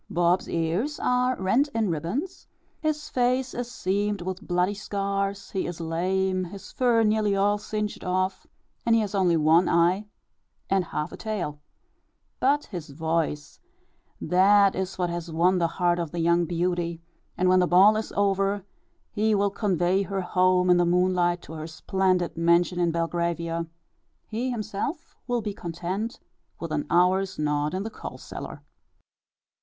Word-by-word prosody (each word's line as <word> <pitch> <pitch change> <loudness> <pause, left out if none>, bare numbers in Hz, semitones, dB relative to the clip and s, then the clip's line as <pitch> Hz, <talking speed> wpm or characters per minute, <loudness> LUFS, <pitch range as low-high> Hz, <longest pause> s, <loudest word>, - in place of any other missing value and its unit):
Bob's 175 +1 +1
ears 175 - -1
are 250 0 +1
rent 225 +10 +2
in 220 -5 +1
ribbons, 180 - -4 0.3
his 310 -1 -2
face 255 +1 0
is 245 0 -4
seamed 205 +1 -1
with 185 +2 -4
bloody 180 +2 +1
scars, 200 -1 -3
he 190 - -2
is 175 -1 -6
lame, 185 +3 0
his 195 +3 -10
fur 240 -3 +3
nearly 210 -1 +2
all 205 +1 +2
singed 210 0 -4
off, 185 +1 -1 0.4
and 230 - +3
he 225 - +3
has 210 -2 -3
only 180 -4 +3
one 160 +3 +4
eye 175 +5 +2 0.6
and 190 -2 +2
half 150 0 -4
a - - -8
tail; 180 -10 -4 0.8
but 285 +3 +2
his 175 -7 -7
voice, 160 0 -2 0.6
that 195 +2 +4
is 190 0 -3
what 175 -2 -1
has 170 -1 -5
won 180 +3 +3
the 170 - +2
heart 175 -1 +2
of 170 -2 -2
the 175 - -5
young 170 +1 +3
beauty; 170 0 -1 0.4
and 185 - +2
when 185 0 +5
the 180 - +3
ball 195 +5 +6
is 215 0 -3
over 195 0 +1 0.5
he 215 +1 +1
will 200 0 +1
convey 190 -2 +1
her 195 0 -2
home 180 0 +3
in 180 - +6
the 175 - +4
moonlight 175 0 +2
to 160 - -10
her 155 0 -6
splendid 185 +2 0
mansion 170 +2 +2
in 175 -1 +2
Belgravia 170 0 -2 0.6
he 235 +4 -3
himself 235 - -4
will 245 -2 0
be 205 -1 -3
content 185 +6 -4 0.4
with 165 -2 -5
an 150 -1 -2
hour's 185 +2 +2
nod 150 +1 0
in 190 - -2
the 225 - -5
coal - - -8
cellar. - - -8
185 Hz, 160 wpm, -26 LUFS, 170-205 Hz, 0.8 s, ball